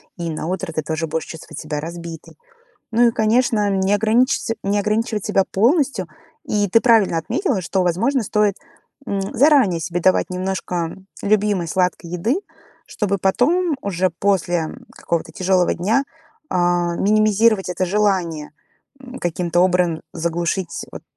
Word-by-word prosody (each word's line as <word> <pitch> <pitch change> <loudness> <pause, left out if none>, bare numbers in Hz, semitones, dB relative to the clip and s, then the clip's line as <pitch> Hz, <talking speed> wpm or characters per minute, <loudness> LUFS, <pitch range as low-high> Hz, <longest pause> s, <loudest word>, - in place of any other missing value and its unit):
И 170 -2 -4
на 155 -1 -4
утро 190 -1 -3
ты 155 -1 -3
тоже 160 +1 -2
будешь 160 +1 -3
чувствовать 160 -2 -9
себя 150 -1 -4
разбитой. 170 +1 -8 0.5
Ну 235 +2 +4
и, 235 - +3
конечно, 220 -1 +2
не 195 0 +1
ограничится 225 +3 +2
не 200 +1 0
ограничивать 215 +1 -1
себя 200 -2 +2
полностью. 250 - +2 0.4
И 205 -1 0
ты 225 +5 +4
правильно 225 -8 +4
отметила, 225 - -1
что, 190 +2 -1
возможно, 220 +9 +1
стоит, 210 -1 +1 0.5
м, 200 -1 -2
заранее 265 - +4
себе 170 +2 -3
давать 185 +2 +3
немножко, 185 0 -3
м, 175 +3 -4 0.2
любимой 205 -4 +1
сладкой 180 -1 -1
еды, 200 - 0 0.5
чтобы 200 -2 -2
потом 300 - +2
уже 185 -2 0
после, 180 0 0
м, - - -10
какого-то 165 -1 -3
тяжелого 185 +1 +1
дня, 220 +10 +1 0.5
а, 175 -1 +1
минимизировать 215 0 +3
это 180 +1 -1
желание, 180 -6 0 0.5
м, 255 0 -10
каким-то 175 0 +1
образом 180 -3 +1
заглушить, 170 +2 -2
вот, - - -9
190 Hz, 145 wpm, -20 LUFS, 175-215 Hz, 0.5 s, Ну